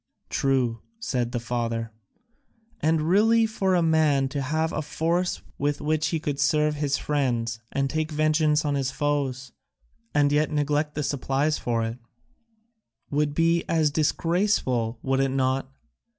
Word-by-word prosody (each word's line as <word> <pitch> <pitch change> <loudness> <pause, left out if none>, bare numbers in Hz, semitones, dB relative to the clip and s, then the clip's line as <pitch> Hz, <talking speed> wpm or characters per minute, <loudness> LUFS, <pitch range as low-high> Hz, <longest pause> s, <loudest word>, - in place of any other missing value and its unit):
"True," 130 -4 +1 0.2
said 125 - -2
the 120 - -2
father, 115 -1 -3 0.9
"and 160 0 +1
really 220 +7 +4
for 195 -4 0
a 175 - +3
man 155 -4 +3
to 140 +1 -3
have 155 +4 -1
a 155 - -1
force 165 +4 -1 0.2
with 145 +1 0
which 155 +1 0
he 165 - -1
could 145 -2 -3
serve 150 +2 +2
his 145 -2 0
friends 120 -6 -1
and 140 0 0
take 155 +2 -2
vengeance 155 0 +2
on 145 - +1
his 135 -2 0
foes, 135 -3 -2 0.6
and 145 +1 +3
yet 150 +1 +2
neglect 150 0 0
the 150 - -1
supplies 140 +2 0
for 115 -1 -1
it, 115 +2 -4 1.1
would 145 0 0
be 165 +1 +2
as 160 -3 +2
disgraceful, 155 - +1
would 135 0 +1
it 135 0 +2
not? 130 0 0
145 Hz, 150 wpm, -25 LUFS, 135-155 Hz, 1.1 s, really